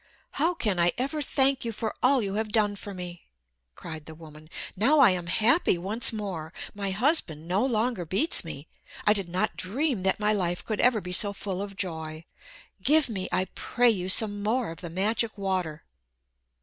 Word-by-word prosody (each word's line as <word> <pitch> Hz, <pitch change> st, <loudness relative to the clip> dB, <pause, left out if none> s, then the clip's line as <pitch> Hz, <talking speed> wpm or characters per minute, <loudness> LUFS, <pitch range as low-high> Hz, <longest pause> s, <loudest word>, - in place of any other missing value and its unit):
"How 330 Hz, +5 st, 0 dB
can 210 Hz, -, 0 dB
I 170 Hz, 0 st, +4 dB
ever 280 Hz, +4 st, -2 dB
thank 270 Hz, -1 st, +2 dB
you 230 Hz, -, -3 dB
for 220 Hz, 0 st, -4 dB
all 255 Hz, -1 st, +3 dB
you 195 Hz, -1 st, -3 dB
have 215 Hz, +1 st, -2 dB
done 210 Hz, -2 st, +2 dB
for 200 Hz, 0 st, -8 dB
me!" 180 Hz, -2 st, -8 dB, 0.5 s
cried 160 Hz, -3 st, -9 dB
the 160 Hz, -, -9 dB
woman. 155 Hz, -1 st, -14 dB, 0.3 s
"Now 260 Hz, +11 st, +3 dB
I 260 Hz, -8 st, +7 dB
am 175 Hz, -2 st, -3 dB
happy 220 Hz, -, +3 dB
once 205 Hz, +7 st, +2 dB
more. 190 Hz, -8 st, -5 dB, 0.2 s
My 200 Hz, -1 st, -3 dB
husband 190 Hz, -, +1 dB
no 190 Hz, +6 st, +1 dB
longer 235 Hz, -5 st, 0 dB
beats 195 Hz, -, +1 dB
me. 160 Hz, -2 st, -8 dB, 0.4 s
I 210 Hz, -, +5 dB
did 195 Hz, -4 st, -1 dB
not 180 Hz, +2 st, -1 dB
dream 255 Hz, +5 st, -1 dB
that 190 Hz, +2 st, 0 dB
my 210 Hz, 0 st, +2 dB
life 175 Hz, -3 st, -1 dB
could 215 Hz, -2 st, -3 dB
ever 245 Hz, -4 st, +3 dB
be 180 Hz, 0 st, -6 dB
so 200 Hz, +2 st, +3 dB
full 195 Hz, -2 st, -5 dB
of 200 Hz, -1 st, -6 dB
joy. 160 Hz, -4 st, -5 dB, 0.6 s
Give 300 Hz, +5 st, +4 dB
me, 190 Hz, -4 st, -4 dB
I 185 Hz, -, +1 dB
pray 245 Hz, -1 st, +2 dB
you, 185 Hz, -4 st, -3 dB
some 205 Hz, +1 st, +4 dB
more 225 Hz, -1 st, -1 dB
of 165 Hz, -, -10 dB
the 170 Hz, -, -6 dB
magic 215 Hz, +5 st, -1 dB
water." 185 Hz, -6 st, -3 dB
200 Hz, 190 wpm, -26 LUFS, 175-230 Hz, 0.6 s, I